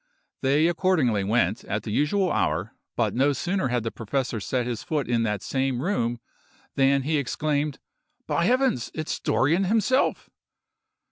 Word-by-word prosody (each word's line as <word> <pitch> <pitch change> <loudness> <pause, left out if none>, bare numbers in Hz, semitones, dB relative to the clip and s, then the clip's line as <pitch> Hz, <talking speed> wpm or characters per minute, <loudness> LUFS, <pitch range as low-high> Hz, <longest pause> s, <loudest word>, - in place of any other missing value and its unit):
They 145 +4 +3
accordingly 160 - +2
went 105 0 +1
at 105 0 -3
the 110 - -5
usual 180 - +1
hour, 85 +8 0 0.2
but 110 -4 0
no 140 +3 +2
sooner 180 +3 -1
had 120 -2 -1
the 115 - -3
professor 120 +1 -2
set 125 +4 -1
his 120 -2 -3
foot 150 -4 -2
in 120 -1 +1
that 105 -3 -1
same 135 -2 -1
room, 120 - -1 0.5
than 135 0 +3
he 155 +3 +1
exclaimed, 145 +1 -1 0.5
"By 170 - 0
Heavens! 250 - +1
it 155 0 -4
is - - -3
Dorrien 165 +8 +2
himself!" 225 +6 +1
135 Hz, 155 wpm, -25 LUFS, 115-160 Hz, 0.5 s, They